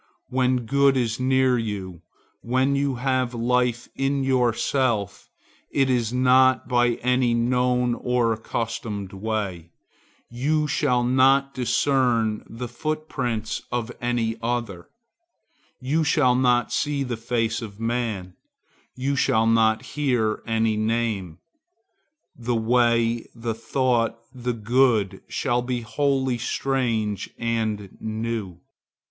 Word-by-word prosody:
When 125 -1 +1
good 140 +2 +3
is 115 -2 -1
near 130 -1 +3
you, 95 -6 -5 0.4
when 130 +3 +1
you 140 -1 0
have 130 -1 -1
life 120 0 0
in 135 0 0
yourself, 125 -3 0 0.4
it 135 -2 +1
is 120 -3 0
not 130 0 +4
by 120 -1 +2
any 125 -1 +2
known 125 +1 +1
or 120 -1 +1
accustomed 110 -3 -4
way; 95 -5 -3 0.6
you 150 +6 0
shall 125 -4 +1
not 135 +2 +3
discern 125 -4 +1
the 120 +2 -6
footprints 125 -4 -3
of 120 -1 -2
any 120 -2 -1
other; 115 -6 -3 0.9
you 145 +5 0
shall 145 -4 +3
not 125 -1 +2
see 145 -1 0
the 125 -2 -3
face 115 0 -1
of 105 -2 -9
man; 115 -6 -2 0.6
you 135 +2 -1
shall 125 -4 +2
not 110 -1 +3
hear 125 -7 0
any 110 -1 +1
name;—the 110 -6 -1 1.2
way, 115 0 +2
the 115 -1 -3
thought, 115 0 0 0.2
the 125 -1 -3
good 115 -4 +2
shall 120 -3 0
be 125 0 -2
wholly 130 +1 0
strange 115 -5 -1
and 110 -4 -2
new. 110 -4 -4
120 Hz, 110 wpm, -24 LUFS, 115-130 Hz, 1.2 s, not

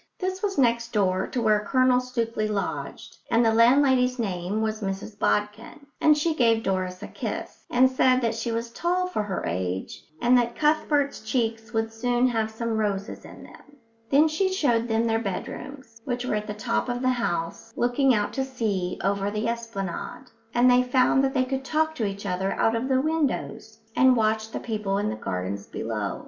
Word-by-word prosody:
This 375 0 -3
was 405 -2 -2
next 235 -2 +2
door 190 -3 +1
to 255 - -3
where 215 -1 +4
Colonel 255 +3 +3
Stookley 230 -3 -2
lodged, 205 -2 -4
and 230 +1 +3
the 225 - +3
landlady's 250 +2 +4
name 195 -2 -2
was 215 0 -2
Mrs 200 +2 -5
Bodkin; 210 +7 -1 0.2
and 305 -1 +5
she 320 +2 +1
gave 230 -6 +2
Doris 185 -1 -2
a - - -5
kiss, - - -6
and 255 +1 +5
said 255 0 +3
that 230 -2 0
she 225 +1 -3
was 230 +1 -3
tall 355 +7 0
for 365 -12 -2
her 205 -2 -3
age 90 +2 -3 0.2
and 245 +1 +4
that 235 0 -1
Cuthbert's 300 -2 +1
cheeks 225 0 -2
would 225 -1 -1
soon 245 +2 +1
have 225 -2 0
some 225 0 -3
roses 200 -1 -2
in - - -12
them. 290 -1 -16 0.3
Then 290 +3 +5
she 375 +5 0
showed 240 -11 +1
them 225 0 +1
their 225 -1 +1
bedrooms, 230 +3 -6
which 245 0 -3
were - - -1
at 210 0 -2
the 210 - -4
top 230 +3 -1
of 245 +1 -2
the 255 - +3
house, 175 -9 -2
looking 245 +3 +2
out 205 -1 -1
to 270 - -1
sea 215 -9 -2
over 200 0 0
the 210 +2 -2
esplanade; 230 +1 -5 0.2
and 240 +1 +5
they 250 0 +5
found 255 +1 +3
that 270 +1 0
they 255 -1 +2
could 265 +1 -3
talk 315 +3 0
to 225 -9 -1
each 200 +1 -6
other 190 +1 -1
out 225 - +1
of 230 +3 -1
the 260 -1 +3
windows 280 -7 -2 0.2
and 260 0 +5
watch 220 0 +1
the - - -5
people 210 -4 -2
in 205 - 0
the - - -3
gardens 95 -1 -4
below. 105 -3 -4
230 Hz, 195 wpm, -25 LUFS, 210-255 Hz, 0.3 s, and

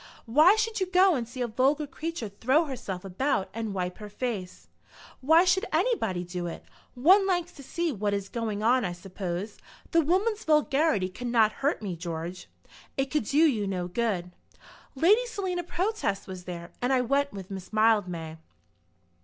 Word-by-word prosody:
"Why 305 - +6
should 440 0 -1
you 375 - 0
go 370 +1 +5
and 240 -6 -2
see 255 +1 -7
a 245 - 0
vulgar 270 +6 +1
creature 310 -5 -5
throw 260 - +2
herself 200 -10 -6
about 195 +2 -1
and 225 -2 -3
wipe 180 -1 -3
her 210 -1 -8
face?" 205 -4 -5 0.5
"Why 320 +6 +5
should 370 +1 +2
anybody 190 - 0
do 175 0 -4
it? 170 - -8 0.3
One 375 +10 +5
likes 355 -2 0
to 285 - -13
see 335 +5 -2
what 210 -4 -1
is 200 -1 -4
going 215 -2 -3
on, 250 +2 +4
I 180 -2 -2
suppose. 185 +2 -5 0.3
The 330 - +5
woman's 390 +8 +1
vulgarity 300 - +2
could 245 +7 -7
not 225 -3 +4
hurt 275 -5 0
me, 190 -4 -3
George." 170 +1 -6 0.5
"It 270 0 -1
could 300 -7 0
do 280 - -1
you 270 -11 +3
no 180 -2 -2
good." 180 -3 -2 0.6
"Lady 415 - +4
Selina 380 -6 -2
Protest 355 - -2
was 185 -2 -8
there, 170 -1 -7
and 245 +2 +1
I 260 -1 +3
went 280 +3 +1
with 195 -1 -9
Miss 190 -1 -7
Mildmay." 185 -8 +1
240 Hz, 175 wpm, -27 LUFS, 190-320 Hz, 0.6 s, Why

